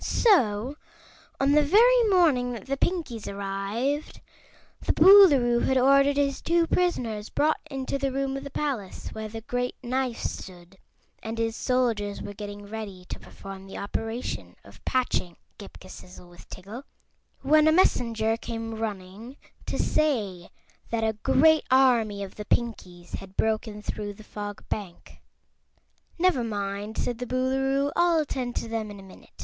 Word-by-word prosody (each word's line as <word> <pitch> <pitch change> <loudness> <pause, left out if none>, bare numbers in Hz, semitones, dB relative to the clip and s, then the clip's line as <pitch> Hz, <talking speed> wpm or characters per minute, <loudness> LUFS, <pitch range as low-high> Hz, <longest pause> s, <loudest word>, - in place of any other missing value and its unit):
So, 260 - +2 0.6
on 275 +1 +3
the 300 +1 +5
very 470 +11 +5
morning 295 -10 +3
that 235 - -8
the 275 - -1
Pinkies 280 - -2
arrived, 200 +9 -3 0.6
the - - +1
Boolooroo 285 -12 +7
had 265 - +2
ordered 275 +2 +4
his 280 -1 0
two 335 0 +2
prisoners 235 -13 -1
brought 310 +2 +1
into 270 0 -3
the 275 -1 -1
room 270 0 -2
of 275 - -5
the 280 - -7
palace 265 -10 -4
where 220 0 -6
the 225 +1 -7
Great 245 +2 -2
Knife 255 -1 -1
stood 180 0 -7 0.4
and 225 +1 -5
his 225 0 -1
soldiers 230 -6 0
were 205 - -7
getting 205 0 -8
ready 200 -4 -7
to - - -5
perform 195 0 -11
the 195 - -8
operation 205 - -4
of 100 +3 -17
patching 245 -9 -1 0.2
Ghip 200 - -11
Ghisizzle 180 -1 -12
with 175 0 -16
Tiggle, 200 +7 -8 0.6
when 305 +3 +5
a - - +6
messenger 230 -10 +2
came 225 -1 -5
running 220 +3 -6 0.3
to - - -2
say 210 - 0 0.4
that 230 -1 -1
a 220 0 +1
great 310 +9 +4
army 235 -6 +3
of 195 - -10
the 210 - -6
Pinkies 185 -8 -2
had 195 0 -12
broken 215 -1 -1
through 205 -1 -4
the 215 - -13
Fog 205 -1 -7
Bank. 195 -5 -7 1.0
"Never 345 -8 +2
mind," 205 -1 -4
said 240 -1 -2
the 250 - -4
Boolooroo, 270 +2 0
"I'll 345 -1 +3
attend 260 -5 -2
to - - -3
them 225 -1 -3
in 205 -1 -9
a - - -12
minute. 190 - -16
230 Hz, 155 wpm, -26 LUFS, 205-275 Hz, 1.0 s, Boolooroo